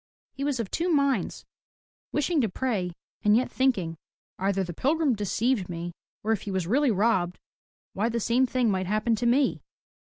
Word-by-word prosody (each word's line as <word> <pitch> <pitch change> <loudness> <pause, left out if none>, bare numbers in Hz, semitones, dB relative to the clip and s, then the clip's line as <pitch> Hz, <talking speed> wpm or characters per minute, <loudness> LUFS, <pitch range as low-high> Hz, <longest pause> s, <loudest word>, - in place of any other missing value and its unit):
He 275 - -5
was 280 -3 0
of 220 -5 -3
two 345 +2 0
minds, 280 -4 +1 0.7
wishing 295 +1 +1
to 225 - +1
pray 190 -5 -1 0.3
and 210 +1 +5
yet 255 - 0
thinking, 195 -12 +1 0.4
"Either 195 0 +1
the 175 -1 -5
pilgrim 290 - +2
deceived 210 0 0
me, 170 0 -5 0.3
or 220 - 0
if 220 - +1
he - - -6
was 190 -3 -1
really 265 - +3
robbed, 190 -4 +2 0.6
why 215 +4 0
the 235 0 -1
same 245 +4 +2
thing 245 -3 +1
might 185 -1 -1
happen 215 +3 +1
to 240 +2 0
me.'' 265 +3 +2
225 Hz, 180 wpm, -27 LUFS, 190-260 Hz, 0.7 s, and